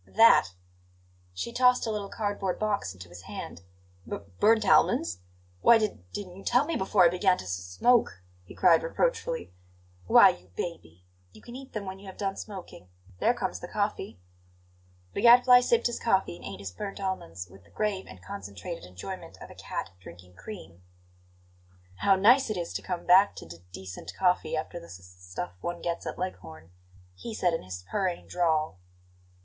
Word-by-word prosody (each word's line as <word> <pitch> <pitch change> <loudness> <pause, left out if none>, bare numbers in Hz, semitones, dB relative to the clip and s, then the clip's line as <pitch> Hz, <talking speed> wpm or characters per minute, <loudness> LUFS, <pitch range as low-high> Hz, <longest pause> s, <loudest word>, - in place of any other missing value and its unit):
"That!" 225 - +6 0.8
She 90 - -5
tossed 250 0 +4
a 225 - -1
little 205 -2 -4
cardboard 205 -3 -2
box 205 - -1
into 90 -1 -11
his 90 0 -11
hand. 95 -2 -8 0.5
"B - - -2 0.2
burnt 220 +1 +4
almonds! 85 +2 +3 0.4
Why 235 - +7
d 215 -2 -2
didn't 185 -3 -7
you 195 - -11
tell 250 +4 +3
me 330 - -2
before 190 -3 +3
I - - +7
began 180 +1 +2
to - - -7
s 90 - -5
smoke?" 90 - +1 0.2
he 90 - -13
cried 170 -3 +5
reproachfully. - - -1 0.5
"Why, - - +8
you 90 +1 -6
baby! 90 - -6 0.3
you - - -16
can 240 - -10
eat 265 0 -10
them 215 -2 -4
when 190 0 -7
you 200 - -13
have 190 - -10
done 195 -1 -2
smoking. 190 - -9 0.3
There - - +3
comes - - -3
the - - -7
coffee." - - -3 0.9
The - - -2
Gadfly 245 +2 +8
sipped 455 - +2
his 240 - 0
coffee 190 - +1
and 85 -1 -12
ate 100 0 -7
his 95 -2 -6
burnt 195 - -6
almonds 95 - -4
with 95 +1 -17
the 85 - -23
grave 210 -3 -2
and 95 - -13
concentrated 100 - -7
enjoyment 90 0 -8
of - - -11
a - - -10
cat 95 - -6
drinking 90 0 -14
cream. 90 - -10 1.2
"How 195 - +4
nice 235 +8 +5
it 215 - -2
is 170 -1 -4
to - - -3
come 180 -2 -4
back 190 +3 +6
to - - -9
d 85 +1 -10
decent 95 0 -8
coffee, 180 -4 +1
after 155 - -4
the - - -13
s 90 +2 -10
s 90 0 -17
stuff 90 -1 -4
one 175 0 -4
gets 170 0 -3
at - - -5
Leghorn!" 80 - -7 0.4
he 220 - -7
said 175 -4 +1
in 165 - -1
his 90 0 -8
purring 185 -4 -2
drawl. 160 - 0
180 Hz, 185 wpm, -28 LUFS, -, 1.2 s, Why